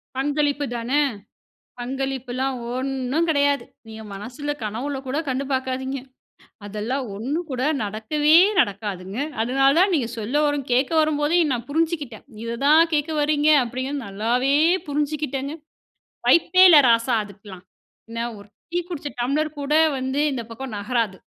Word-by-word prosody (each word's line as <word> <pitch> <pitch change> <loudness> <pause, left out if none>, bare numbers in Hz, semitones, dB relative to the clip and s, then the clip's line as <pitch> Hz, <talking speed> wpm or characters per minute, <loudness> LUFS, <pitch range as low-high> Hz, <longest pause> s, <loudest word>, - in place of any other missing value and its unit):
பங்களிப்பு 290 +1 0
தான, 235 +2 -4 0.9
பங்களிப்புல்லாம் 265 0 -3 0.2
ஒண்ணும் 270 +5 -1
கெடையாது. 285 -2 +2 0.2
நீங்க 220 0 -9
மனசுல 250 +9 -5
கனவுல 245 +7 -3
கூட 270 +3 -2
கண்டு 260 +1 -1
பார்க்காதீங்க. 260 +1 -2 0.7
அதெல்லாம் 220 +7 -3
ஒண்ணும் 285 - -3
கூட 255 -1 -2 0.2
நடக்கவே 225 +10 +2 0.2
நடக்காதுங்க. 200 0 -3 0.2
அதனால 270 +3 +3
தான் 380 0 +4
நீங்க 250 -7 0
சொல்ல 220 +5 -4
வரும் 290 -2 -1
கேக்க 260 +4 +2
வரும்போதே 310 +2 +2
நான் 240 -1 -3
புரிஞ்சிக்கிட்டேன். 305 - -2 0.2
இத 230 0 -3
தான் 320 +3 +6
கேக்க 300 +2 0
வர்றீங்க 295 0 +2
அப்படிங்கிறத, 260 +4 -4
நல்லாவே 240 +7 0 0.3
புரிஞ்சுக்கிட்டங்க. 290 -1 -2 0.7
வாய்ப்பே 365 +2 +5
இல்ல 325 - +9
ராசா 230 +1 +3
அதுக்கெல்லாம். 195 -2 -13 0.5
என்ன 230 +1 -3
ஒரு 200 0 -13 0.2
டீ 350 - 0
குடிச்ச 300 -4 -5
டம்ளர் 295 +4 -1
கூட 285 +1 -2 0.3
வந்து 260 +2 -2
இந்த 255 - -3
பக்கம் 230 0 -7
நகராது. 215 -2 -1
265 Hz, 130 wpm, -23 LUFS, 230-290 Hz, 0.9 s, இல்ல